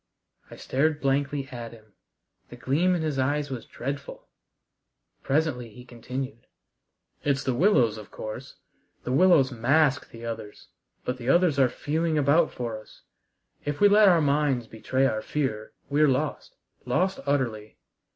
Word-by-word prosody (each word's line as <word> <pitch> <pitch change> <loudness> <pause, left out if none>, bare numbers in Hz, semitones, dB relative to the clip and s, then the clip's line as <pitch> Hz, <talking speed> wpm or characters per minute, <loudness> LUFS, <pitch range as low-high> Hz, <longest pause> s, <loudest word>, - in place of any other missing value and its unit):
I - - -10
stared 150 +3 0
blankly 140 0 0
at 120 -3 -7
him. 110 -2 -18 0.6
The - - -10
gleam 175 +7 +1
in 165 - -2
his 150 -4 -2
eyes 145 +2 0
was 125 -3 -6
dreadful. 140 +3 -6 0.9
Presently 135 -5 -1
he 125 +3 -13
continued. 125 +1 -7 0.8
"It's 140 -1 0
the 130 - 0
willows, 120 - +3
of 105 - -12
course. 110 +4 -8 0.5
The 125 - -3
willows 145 -2 +5
mask 140 +4 +2
the 115 0 -10
others, 115 -3 -7 0.4
but 125 - -2
the 120 +1 -4
others 170 -2 +3
are 130 -2 +5
feeling 155 +5 -1
about 150 +3 +3
for 115 -3 -5
us. - - -20 0.6
If 145 0 -3
we 205 - +7
let 205 0 +6
our 170 -3 +4
minds 140 -4 +1
betray 130 +4 -1
our 110 -4 0
fear, 110 -8 -3 0.2
we're 150 +2 +3
lost, 130 -2 -2 0.3
lost 185 +10 0
utterly." 115 -7 -1
135 Hz, 150 wpm, -26 LUFS, 120-150 Hz, 0.9 s, we